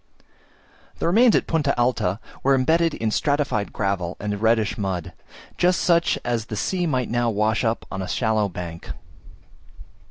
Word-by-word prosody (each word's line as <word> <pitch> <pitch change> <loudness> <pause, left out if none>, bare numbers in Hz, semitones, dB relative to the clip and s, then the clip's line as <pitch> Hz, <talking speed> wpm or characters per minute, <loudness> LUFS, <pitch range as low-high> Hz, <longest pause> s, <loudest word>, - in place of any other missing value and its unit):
The - - -3
remains 220 +7 +5
at - - +2
Punta 150 -6 0
Alta 115 -5 +1 0.2
were 135 0 +3
embedded 160 +5 +2
in 110 -1 -1
stratified 140 -6 0
gravel 95 -3 -2
and 105 0 -3
reddish 110 -2 +2
mud, 95 -4 -3 0.5
just 180 0 +3
such 170 -1 +2
as 120 -2 -1
the 110 - -6
sea 175 - -1
might 130 -6 -1
now 120 0 +1
wash 110 +2 +1
up 115 0 -1
on 95 - -4
a 95 - -4
shallow 110 -3 0
bank. 85 -2 -7
115 Hz, 155 wpm, -23 LUFS, 100-145 Hz, 0.5 s, remains